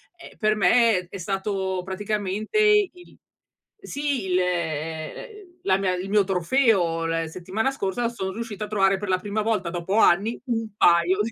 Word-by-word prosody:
ehm, 345 Hz, -, -14 dB
per 215 Hz, 0 st, +2 dB
me 210 Hz, -2 st, +3 dB
è 195 Hz, -, -7 dB
stato 190 Hz, 0 st, -2 dB
praticamente 205 Hz, -, -3 dB, 0.3 s
il 360 Hz, -1 st, -17 dB, 0.6 s
sì, 285 Hz, -, -3 dB
il, 185 Hz, -1 st, +1 dB
ehm, 160 Hz, -3 st, -2 dB, 0.3 s
ehm, 360 Hz, -3 st, -19 dB
la 190 Hz, -1 st, +3 dB
mia 190 Hz, -1 st, 0 dB
il 185 Hz, +2 st, -5 dB
mio 205 Hz, 0 st, +4 dB
trofeo 185 Hz, -3 st, +1 dB
la 165 Hz, 0 st, -1 dB
settimana 185 Hz, +8 st, -2 dB
scorsa 235 Hz, -2 st, -2 dB
son 190 Hz, -5 st, -5 dB
riuscita 220 Hz, -1 st, -5 dB
a -, -, -10 dB
trovare 195 Hz, -2 st, +2 dB
per 205 Hz, +2 st, -6 dB
la 185 Hz, -1 st, +2 dB
prima 205 Hz, +2 st, -2 dB
volta 210 Hz, -5 st, 0 dB
dopo 175 Hz, +4 st, -2 dB
anni 215 Hz, +2 st, +3 dB
un 225 Hz, -3 st, -2 dB
paio 175 Hz, 0 st, +4 dB
di 225 Hz, +2 st, -2 dB
195 Hz, 170 wpm, -24 LUFS, 180-220 Hz, 0.6 s, mio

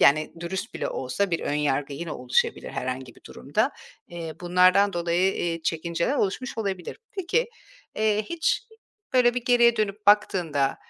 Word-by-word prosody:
yani, 155 Hz, +2 st, +4 dB
dürüst 190 Hz, +6 st, -4 dB
bile -, -, -2 dB
olsa 130 Hz, +10 st, -2 dB
bir 170 Hz, -, 0 dB
ön -, -, -2 dB
yargı 145 Hz, -1 st, 0 dB
yine 160 Hz, +2 st, -5 dB
oluşabilir 125 Hz, 0 st, 0 dB
herhangi 130 Hz, -1 st, -4 dB
bir -, -, -21 dB
durumda. -, -, -1 dB, 0.4 s
Eee, 165 Hz, -2 st, -6 dB
bunlardan 185 Hz, +3 st, +4 dB
dolayı, 175 Hz, +2 st, +1 dB
eee, 165 Hz, -1 st, -2 dB
çekinceler 170 Hz, -, -1 dB
oluşmuş 245 Hz, +3 st, -2 dB
olabilir. 190 Hz, -5 st, -3 dB, 0.2 s
Peki, 385 Hz, +7 st, 0 dB, 0.5 s
eee, 215 Hz, 0 st, +2 dB
hiç 335 Hz, -, 0 dB, 0.5 s
böyle 245 Hz, -1 st, +4 dB
bir 245 Hz, -1 st, -3 dB
geriye 240 Hz, -1 st, +5 dB
dönüp 210 Hz, 0 st, -2 dB
baktığında, 175 Hz, -9 st, +3 dB
180 Hz, 150 wpm, -25 LUFS, 155-215 Hz, 0.5 s, geriye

